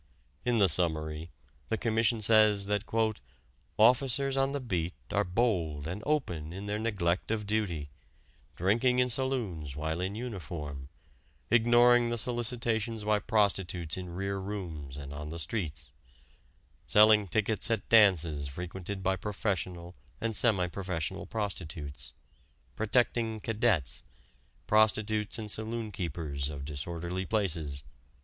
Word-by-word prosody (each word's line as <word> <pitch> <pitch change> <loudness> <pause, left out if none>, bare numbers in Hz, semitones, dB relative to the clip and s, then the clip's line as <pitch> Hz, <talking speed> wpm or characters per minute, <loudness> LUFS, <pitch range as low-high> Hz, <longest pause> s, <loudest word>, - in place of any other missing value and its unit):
In 120 -1 +2
the 100 -3 +5
summary, 80 -1 0 0.4
the 110 - 0
Commission 115 0 +1
says 110 -2 +5
that 105 +1 -1 0.9
"officers 130 +4 +4
on 135 0 +2
the 140 - -2
beat 90 - -2 0.2
are - - +2
bold 90 -8 0
and 90 +5 -4
open 90 - -1
in 95 +3 -7
their 105 +1 -2
neglect 95 -6 0
of 110 -1 -1
duty, 95 -9 -2 0.6
drinking 115 +8 +2
in 125 0 +2
saloons 110 - -2
while 80 +3 -2
in 95 +2 -2
uniform, 85 - -6 0.6
ignoring 120 +1 +5
the 120 - -1
solicitations 115 -1 -1
by 105 0 +2
prostitutes 95 -7 0
in 90 -1 -6
rear 100 +3 -3
rooms 85 -9 -6
and 70 -1 -7
on 75 +1 -6
the 85 - -6
streets, 75 -5 -4 0.9
selling 105 -1 +6
tickets 110 +5 +2
at 115 -3 -1
dances 85 -10 +4
frequented 90 +6 -6
by 95 0 +2
professional 95 -4 -3 0.3
and 115 -1 -2
semi 100 -7 +3
professional 90 -3 -3
prostitutes; 80 -9 -5 0.6
protecting 110 0 +1
'cadets,' 105 - 0 0.6
prostitutes 110 0 +2
and 105 -2 -4
saloon 110 0 -3
keepers 75 -6 -3
of 70 -2 -6
disorderly 85 +5 -4
places." 85 -9 -1
100 Hz, 125 wpm, -30 LUFS, 85-110 Hz, 0.9 s, selling